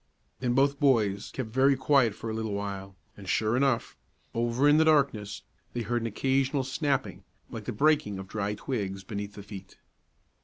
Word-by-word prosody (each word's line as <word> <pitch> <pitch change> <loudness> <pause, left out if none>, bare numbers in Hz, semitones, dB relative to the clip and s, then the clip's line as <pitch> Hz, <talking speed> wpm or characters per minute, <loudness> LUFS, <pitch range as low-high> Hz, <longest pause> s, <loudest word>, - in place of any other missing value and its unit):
Then 125 -1 0
both 140 +1 +3
boys 110 -9 +2
kept 130 -4 -5
very 135 +3 +4
quiet 130 -5 +3
for - - -7
a 110 - -2
little 110 -1 -3
while, 100 -1 -5 0.2
and 100 -2 -9
sure 110 +1 +1
enough, 130 -2 +1 0.4
over 120 +4 +1
in 145 +1 +6
the 160 - +5
darkness, 140 -10 +2 0.3
they 120 - -2
heard 120 +2 -1
an 115 - -2
occasional 135 +4 +1
snapping, 135 0 -1 0.3
like - - -7
the - - -2
breaking 140 -5 +2
of 95 0 -7
dry 105 0 -2
twigs 100 -5 -4
beneath 100 +1 -6
the 100 - -9
feet. 100 -2 -10
115 Hz, 180 wpm, -28 LUFS, 100-135 Hz, 0.4 s, in